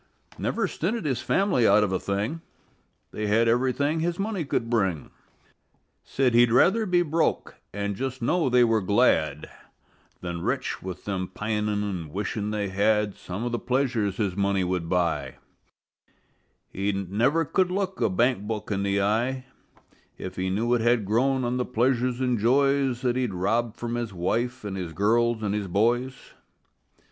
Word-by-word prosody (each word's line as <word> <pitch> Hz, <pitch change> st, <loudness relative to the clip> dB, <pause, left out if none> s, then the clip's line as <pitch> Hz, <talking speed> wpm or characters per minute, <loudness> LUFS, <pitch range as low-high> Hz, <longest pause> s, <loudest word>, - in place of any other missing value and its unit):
Never -, -, 0 dB
stinted 200 Hz, +3 st, -2 dB
his 130 Hz, -4 st, -1 dB
family 190 Hz, -, +2 dB
out 105 Hz, +1 st, +5 dB
of 100 Hz, -, -1 dB
a 95 Hz, -, 0 dB
thing: 105 Hz, +12 st, -2 dB, 0.7 s
They 105 Hz, 0 st, -3 dB
had 115 Hz, +3 st, +3 dB
everything 130 Hz, +6 st, +1 dB
that 160 Hz, -, 0 dB
his 175 Hz, 0 st, -1 dB
money 200 Hz, -3 st, -2 dB
could 125 Hz, -4 st, -2 dB
bring; 95 Hz, -10 st, -1 dB, 0.9 s
Said 130 Hz, -3 st, 0 dB
he'd 120 Hz, 0 st, +5 dB
rather 200 Hz, -, +4 dB
be 175 Hz, -1 st, +3 dB
broke 160 Hz, 0 st, 0 dB, 0.2 s
and 100 Hz, 0 st, -3 dB
just 130 Hz, +4 st, -4 dB
know 155 Hz, +5 st, +1 dB
they 125 Hz, 0 st, +5 dB
were 115 Hz, -2 st, +2 dB
glad, 80 Hz, -, +2 dB, 0.7 s
Than 85 Hz, -1 st, -4 dB
rich, -, -, -2 dB
with 90 Hz, -2 st, -7 dB
them 95 Hz, -2 st, -2 dB
pining 105 Hz, +1 st, -2 dB
an' 90 Hz, -6 st, -4 dB
wishing 105 Hz, +3 st, -3 dB
they 105 Hz, -2 st, -2 dB
had 105 Hz, +1 st, +1 dB
Some 90 Hz, +5 st, -6 dB
of 120 Hz, -, -2 dB
the 120 Hz, -, -1 dB
pleasures 120 Hz, -6 st, 0 dB
his 100 Hz, -5 st, -1 dB
money 100 Hz, -1 st, +1 dB
would 90 Hz, -2 st, -2 dB
buy; 80 Hz, -7 st, 0 dB, 1.4 s
Said -, -, -10 dB
he 100 Hz, +1 st, +1 dB
never 110 Hz, -, +1 dB
could 185 Hz, +4 st, +1 dB
look 190 Hz, 0 st, -2 dB
a -, -, +3 dB
bank 105 Hz, +1 st, +1 dB
book 110 Hz, -1 st, -4 dB
in 100 Hz, -1 st, 0 dB
the 100 Hz, 0 st, +1 dB
eye 120 Hz, +6 st, 0 dB, 0.7 s
If 95 Hz, 0 st, -7 dB
he 95 Hz, 0 st, -2 dB
knew 115 Hz, +6 st, 0 dB
it 120 Hz, -, +2 dB
had 120 Hz, -2 st, +2 dB
grown 130 Hz, +6 st, +1 dB
on 120 Hz, +1 st, -1 dB
the 125 Hz, -, 0 dB
pleasures 125 Hz, +1 st, 0 dB
and 125 Hz, -3 st, 0 dB
joys 135 Hz, +2 st, +2 dB
That 125 Hz, -1 st, +1 dB
he'd 125 Hz, -7 st, -1 dB
robbed 110 Hz, +5 st, 0 dB
from 120 Hz, 0 st, -4 dB
his 120 Hz, -2 st, -3 dB
wife 120 Hz, +8 st, -1 dB
and 100 Hz, -2 st, -4 dB
his 90 Hz, -4 st, -5 dB
girls 115 Hz, +5 st, +1 dB
and 100 Hz, -1 st, -1 dB
his 105 Hz, -2 st, -2 dB
boys. 120 Hz, +7 st, +1 dB
115 Hz, 175 wpm, -26 LUFS, 100-130 Hz, 1.4 s, out